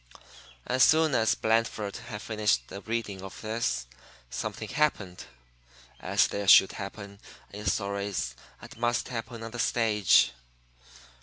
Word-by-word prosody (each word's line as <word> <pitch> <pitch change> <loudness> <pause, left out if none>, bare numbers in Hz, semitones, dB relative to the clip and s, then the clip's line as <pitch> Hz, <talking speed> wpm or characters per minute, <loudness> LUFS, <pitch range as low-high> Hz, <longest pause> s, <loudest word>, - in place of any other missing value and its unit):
'" - - -20 0.2
As 130 0 +3
soon 160 -2 +4
as 110 -3 +3
Blandford 110 -2 0
had 115 -3 -8
finished 105 -2 0
the 100 - -8
reading 110 -4 -4
of 95 0 -9
this, 110 - -2 0.5
something - - -5
happened 100 -12 -1 0.7
(as - - +2
there 100 -1 -4
should 95 - +8
happen 100 0 -8 0.3
in 105 0 -7
stories 100 - -2 0.2
and - - -12
must 120 0 0
happen 115 -1 -6
on 115 - -7
the 120 - -7
stage). 110 - +3
110 Hz, 135 wpm, -28 LUFS, 100-115 Hz, 0.7 s, should